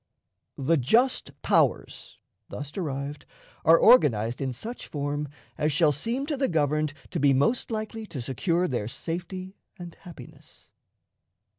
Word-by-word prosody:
The 160 Hz, +5 st, +2 dB
"just 230 Hz, -, +2 dB
powers," -, -, +1 dB, 0.3 s
thus 145 Hz, 0 st, -7 dB
derived, 145 Hz, -4 st, -5 dB, 0.4 s
are 165 Hz, +1 st, +7 dB
organized 125 Hz, -, +4 dB
in 135 Hz, -1 st, -1 dB
such 220 Hz, -, -7 dB
form 145 Hz, 0 st, -3 dB, 0.3 s
as 150 Hz, +1 st, +2 dB
shall 150 Hz, +2 st, +4 dB
seem 230 Hz, -, -2 dB
to 295 Hz, -1 st, -2 dB
the 270 Hz, 0 st, +1 dB
governed 150 Hz, -2 st, +1 dB, 0.2 s
to -, -, -2 dB
be 140 Hz, -1 st, +4 dB
most 145 Hz, -, +1 dB
likely 220 Hz, 0 st, -4 dB
to 160 Hz, -7 st, -7 dB
secure 165 Hz, +9 st, 0 dB
their 120 Hz, -7 st, -2 dB
safety 185 Hz, -, -6 dB, 0.2 s
and 175 Hz, -2 st, -9 dB
happiness. 175 Hz, -3 st, -14 dB
155 Hz, 135 wpm, -26 LUFS, 140-195 Hz, 0.4 s, are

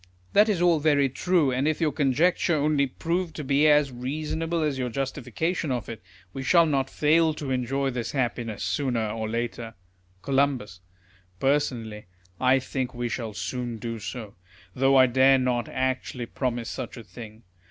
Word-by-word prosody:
That 210 Hz, +2 st, +5 dB
is 180 Hz, -4 st, +1 dB
all 170 Hz, -3 st, +4 dB
very 145 Hz, -2 st, +3 dB
true; 160 Hz, +1 st, +1 dB
and 130 Hz, +3 st, 0 dB
if 155 Hz, -1 st, 0 dB
your 160 Hz, -3 st, +1 dB
conjecture 155 Hz, +5 st, +2 dB
only 145 Hz, -1 st, +2 dB
prove 170 Hz, +5 st, -2 dB
to 150 Hz, -, -6 dB
be 140 Hz, +2 st, +3 dB
as 150 Hz, -2 st, +4 dB
reasonable 155 Hz, +6 st, -2 dB
as 145 Hz, -3 st, -1 dB
your 125 Hz, -1 st, -1 dB
justification 140 Hz, +5 st, -2 dB
of 120 Hz, -4 st, -2 dB
it, 115 Hz, -4 st, -7 dB, 0.3 s
we 135 Hz, -, -5 dB
shall 170 Hz, +5 st, +5 dB
not 135 Hz, -3 st, 0 dB
fail 160 Hz, +1 st, +3 dB
to 145 Hz, -3 st, -5 dB
enjoy 135 Hz, +2 st, 0 dB
this 120 Hz, -3 st, -4 dB
happiness 120 Hz, -5 st, -2 dB
sooner 120 Hz, -6 st, -1 dB
or 110 Hz, 0 st, -3 dB
later. 115 Hz, 0 st, -4 dB, 0.5 s
Col. 140 Hz, 0 st, +2 dB, 0.8 s
Personally, 120 Hz, -7 st, -1 dB, 0.3 s
I 130 Hz, +1 st, +4 dB
think 130 Hz, -1 st, -3 dB
we 120 Hz, 0 st, -2 dB
shall 115 Hz, -3 st, -4 dB
soon 120 Hz, -1 st, -4 dB
do 115 Hz, +1 st, -5 dB
so; 110 Hz, -1 st, -7 dB, 0.4 s
though 135 Hz, +1 st, +3 dB
I 130 Hz, -1 st, +8 dB
dare 130 Hz, +2 st, +5 dB
not 125 Hz, -2 st, 0 dB
actually 130 Hz, -1 st, -2 dB
promise 120 Hz, -2 st, -3 dB
such -, -, -6 dB
a 115 Hz, -, -8 dB
thing. 110 Hz, +1 st, -11 dB
135 Hz, 165 wpm, -26 LUFS, 120-150 Hz, 0.8 s, I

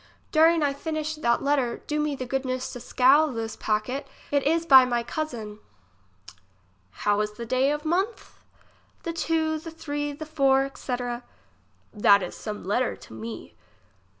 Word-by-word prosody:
During 325 Hz, 0 st, +5 dB
I 285 Hz, -1 st, +1 dB
finish 310 Hz, +1 st, -3 dB
that 235 Hz, -6 st, +1 dB
letter, 275 Hz, -4 st, 0 dB
do 300 Hz, 0 st, -1 dB
me 300 Hz, -1 st, 0 dB
the 255 Hz, -, -5 dB
goodness 255 Hz, 0 st, -2 dB
to 245 Hz, -, -6 dB
seal 265 Hz, +5 st, +4 dB
this 225 Hz, -5 st, -4 dB
packet; 220 Hz, +6 st, -2 dB, 0.2 s
it 285 Hz, -1 st, +3 dB
is 325 Hz, +4 st, +1 dB
by 265 Hz, -5 st, +9 dB
my 240 Hz, -2 st, 0 dB
cousin. 235 Hz, -6 st, -5 dB, 1.5 s
How 205 Hz, 0 st, +3 dB
is 210 Hz, 0 st, -2 dB
the 235 Hz, +2 st, -7 dB
day 255 Hz, +4 st, +2 dB
of 295 Hz, +1 st, -2 dB
month? 380 Hz, +8 st, -2 dB, 0.6 s
The 335 Hz, -, -3 dB
two, 320 Hz, -1 st, 0 dB
the 330 Hz, -, -8 dB
three, 290 Hz, -2 st, -4 dB
the 295 Hz, +2 st, -7 dB
four, 275 Hz, -3 st, +3 dB
etc. 245 Hz, -3 st, -4 dB, 0.7 s
That 205 Hz, -2 st, +5 dB
is 180 Hz, -, -6 dB
some 210 Hz, -1 st, -6 dB
letter 225 Hz, +7 st, 0 dB
to -, -, -14 dB
me. 110 Hz, 0 st, -8 dB
270 Hz, 155 wpm, -26 LUFS, 235-310 Hz, 1.5 s, by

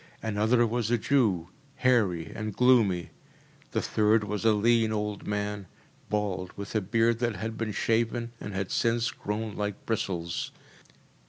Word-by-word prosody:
Another 110 Hz, +3 st, +2 dB
was 115 Hz, -1 st, -1 dB
a 120 Hz, -, +3 dB
Jew, 105 Hz, -9 st, +1 dB, 0.3 s
hairy 100 Hz, -10 st, +2 dB
and 105 Hz, -1 st, -4 dB
gloomy. 115 Hz, -9 st, +3 dB, 0.6 s
The -, -, -1 dB
third 110 Hz, 0 st, +3 dB
was 105 Hz, 0 st, -3 dB
a 115 Hz, -, +5 dB
lean 115 Hz, +1 st, +3 dB
old 105 Hz, -1 st, -3 dB
man, 105 Hz, -1 st, -2 dB, 0.4 s
bald, 100 Hz, -3 st, -1 dB
with 100 Hz, 0 st, -6 dB
a 110 Hz, -, +1 dB
beard 115 Hz, +3 st, +2 dB
that 120 Hz, -3 st, 0 dB
had 110 Hz, +1 st, -4 dB
been 110 Hz, -1 st, -2 dB
shaven 115 Hz, +2 st, 0 dB
and 105 Hz, -, -6 dB
had 95 Hz, -1 st, -3 dB
since 115 Hz, 0 st, +1 dB
grown 105 Hz, +1 st, -4 dB
like 105 Hz, -1 st, -4 dB
bristles. 90 Hz, -7 st, -2 dB
110 Hz, 150 wpm, -28 LUFS, 100-115 Hz, 0.6 s, a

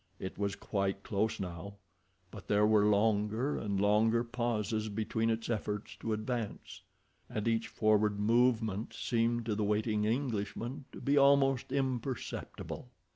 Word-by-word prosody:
It 95 Hz, -, -5 dB
was 100 Hz, -1 st, -2 dB
quite 100 Hz, -1 st, -2 dB
close 110 Hz, +2 st, -1 dB
now, 95 Hz, +1 st, -6 dB, 0.6 s
but -, -, -10 dB
there 105 Hz, 0 st, +4 dB
were 105 Hz, -1 st, +4 dB
longer 105 Hz, +5 st, +2 dB
and 100 Hz, -2 st, -2 dB
longer 110 Hz, +3 st, +3 dB
pauses 115 Hz, -3 st, -1 dB
between 110 Hz, +2 st, -1 dB
its 115 Hz, 0 st, -1 dB
efforts 105 Hz, -2 st, -3 dB
to 115 Hz, -, -4 dB
advance, 110 Hz, 0 st, -4 dB, 0.5 s
and 105 Hz, +1 st, -3 dB
each 115 Hz, 0 st, +1 dB
forward 105 Hz, -1 st, +2 dB
movement 110 Hz, -1 st, +2 dB
seemed 120 Hz, 0 st, 0 dB
to 110 Hz, -, 0 dB
the 105 Hz, +1 st, -1 dB
waiting 105 Hz, +1 st, +1 dB
Englishman 120 Hz, +2 st, -2 dB
to -, -, -9 dB
be 140 Hz, +1 st, +3 dB
almost 135 Hz, -2 st, +4 dB
imperceptible. 130 Hz, -2 st, -3 dB
110 Hz, 135 wpm, -32 LUFS, 105-120 Hz, 0.6 s, there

